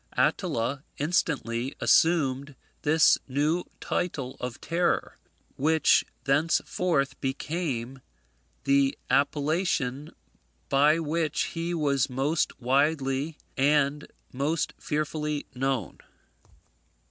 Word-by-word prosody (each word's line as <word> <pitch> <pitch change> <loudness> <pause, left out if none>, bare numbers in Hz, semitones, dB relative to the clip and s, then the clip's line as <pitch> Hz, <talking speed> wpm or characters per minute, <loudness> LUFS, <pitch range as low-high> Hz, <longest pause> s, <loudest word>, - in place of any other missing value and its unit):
Attila 130 +5 0
instantly 140 -5 -1
assumed 140 -4 +2 0.3
this 155 +1 +4
new 150 +6 0
title 140 -7 -3
of 125 -2 -5
terror, 170 +2 -1 0.4
which 155 +2 +4 0.2
thenceforth 145 0 +1
became 135 -3 -3 0.6
the 140 0 +2
appellation 145 -1 0 0.5
by 145 +3 +4
which 160 -1 -1
he 170 +1 -2
was 140 -5 +1
most 135 +5 -1
widely 140 +3 +1 0.2
and 145 +1 +2 0.3
most 145 +5 -1
fearfully 150 0 -2
known. 130 -5 -2
145 Hz, 80 wpm, -27 LUFS, 135-160 Hz, 0.6 s, this